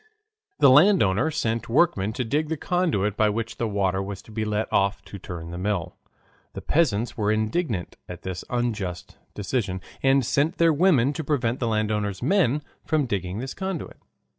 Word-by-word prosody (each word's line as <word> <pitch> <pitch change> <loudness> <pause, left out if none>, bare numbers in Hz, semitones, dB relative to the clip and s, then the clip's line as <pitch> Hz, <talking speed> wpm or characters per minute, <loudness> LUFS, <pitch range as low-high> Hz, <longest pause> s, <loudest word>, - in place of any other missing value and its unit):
The 140 -3 +6
landowner 150 - +5
sent 115 -8 -2
workmen 115 - +2
to 125 +2 -2
dig 150 +6 0
the 160 - -1
conduit 145 - 0
by 105 0 +3
which 115 +2 -3
the 115 - -1
water 95 -2 0
was 100 0 -6
to - - -15
be 110 0 -2
let 105 0 -1
off 100 0 +1
to 100 - -10
turn 85 -2 -7
the 85 - -6
mill. 95 -3 -2 0.6
The - - -6
peasants 120 -8 +1
were 105 -3 +1
indignant 110 - -1
at 90 0 -8
this 95 -1 -5
unjust 110 -8 -3 0.2
decision, 100 -2 -2 0.2
and 135 -1 +3
sent 150 +8 +1
their 165 -1 +4
women 145 -5 +3
to 160 - -4
prevent 130 -5 0
the 120 - -1
landowner's 105 -2 -1
men 150 - +2 0.2
from 155 -3 +1
digging 95 -4 -3
this 130 +3 -5
conduit. 190 -4 -5
115 Hz, 175 wpm, -25 LUFS, 100-145 Hz, 0.6 s, The